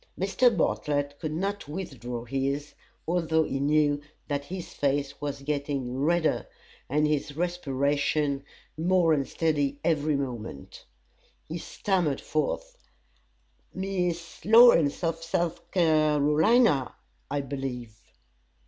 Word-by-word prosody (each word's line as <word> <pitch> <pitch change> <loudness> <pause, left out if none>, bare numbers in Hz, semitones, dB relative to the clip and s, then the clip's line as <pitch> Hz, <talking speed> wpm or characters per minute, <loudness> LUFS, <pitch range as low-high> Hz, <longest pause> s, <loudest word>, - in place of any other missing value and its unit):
Mr. 200 +7 +4
Bartlett 145 -3 0
could 155 - -3
not 195 +3 -3
withdraw 125 - -6
his, 135 +3 -2 0.3
although 165 -2 +2
he 135 - -3
knew 145 0 +2 0.3
that 145 -1 -2
his 180 +1 -7
face 140 0 -1
was 140 -1 -4
getting 140 -3 -2
redder 160 +4 +1 0.4
and 150 +3 +2
his 150 -1 -2
respiration 145 -3 0 0.3
more 170 0 +3
unsteady 145 0 0
every 155 -2 +1
moment. 120 - -6 0.6
He 165 +2 -5
stammered 175 -6 -1
forth: - - -2 1.0
"Miss 180 -3 -3
Lawrence, 220 -10 +6
of 165 0 -1
South 170 0 -2
Carolina, 155 - +3 0.3
I 145 +1 -1
believe." 130 -5 -5
150 Hz, 105 wpm, -27 LUFS, 140-170 Hz, 1.0 s, Lawrence